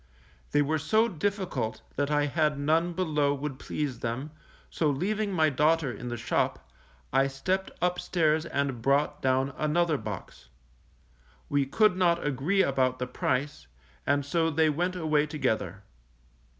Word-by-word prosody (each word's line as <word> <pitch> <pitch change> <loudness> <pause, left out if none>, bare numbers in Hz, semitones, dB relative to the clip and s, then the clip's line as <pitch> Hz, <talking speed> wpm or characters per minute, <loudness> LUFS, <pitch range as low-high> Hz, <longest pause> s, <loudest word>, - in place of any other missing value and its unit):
They 145 0 +4
were 155 +2 0
so 220 +9 +3
difficult 180 - -2
that 145 0 0
I 145 -1 +2
had 150 0 +1
none 160 +4 +1
below 150 -5 +1
would 140 -1 -5
please 140 -6 -3
them, 125 +6 -3 0.4
so 155 - 0
leaving 205 +8 -1
my 160 -4 +3
daughter 150 0 +2
in 120 +2 -7
the 120 0 -3
shop, 65 - -1 0.5
I 135 +1 +4
stepped 185 +8 -2
upstairs 170 -3 +1
and 140 -6 -2
brought 145 +3 +1
down 130 +1 +1
another 155 0 +1
box. 90 - -8 1.0
We 140 -1 +1
could 215 +6 +3
not 175 -2 +2
agree 145 +8 +2
about 130 -2 +1
the 125 - -2
price, 125 - -2 0.4
and 145 0 +2
so 165 +3 +1
they 160 0 +3
went 175 +5 -1
away 155 -3 +1
together. 105 - -2
150 Hz, 145 wpm, -28 LUFS, 135-165 Hz, 1.0 s, They